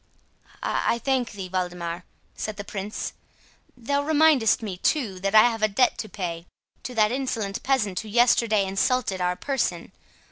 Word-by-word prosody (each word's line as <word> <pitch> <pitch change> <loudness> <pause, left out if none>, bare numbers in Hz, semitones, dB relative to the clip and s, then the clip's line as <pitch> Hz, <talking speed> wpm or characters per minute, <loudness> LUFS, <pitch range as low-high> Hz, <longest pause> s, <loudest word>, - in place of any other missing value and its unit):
"I 235 - +1
thank 255 -1 -1
thee, 195 -2 -6
Waldemar," 180 -1 -3 0.3
said 215 -1 -5
the 205 - -5
Prince; 200 +1 -5 0.6
"thou 280 +4 0
remindest 295 -7 +3
me, 195 -4 -4
too, 210 - 0
that 195 +2 -1
I 215 - +9
have 225 -1 -6
a 215 - +4
debt 245 +4 +2
to 215 - -5
pay 170 -3 -5 0.3
to 250 - -7
that 215 -1 +3
insolent 230 -6 -2
peasant 220 -9 0
who 220 - -7
yesterday 230 -2 +3
insulted 195 0 0
our 180 0 +1
person. 205 -9 -2
215 Hz, 155 wpm, -25 LUFS, 190-250 Hz, 0.6 s, I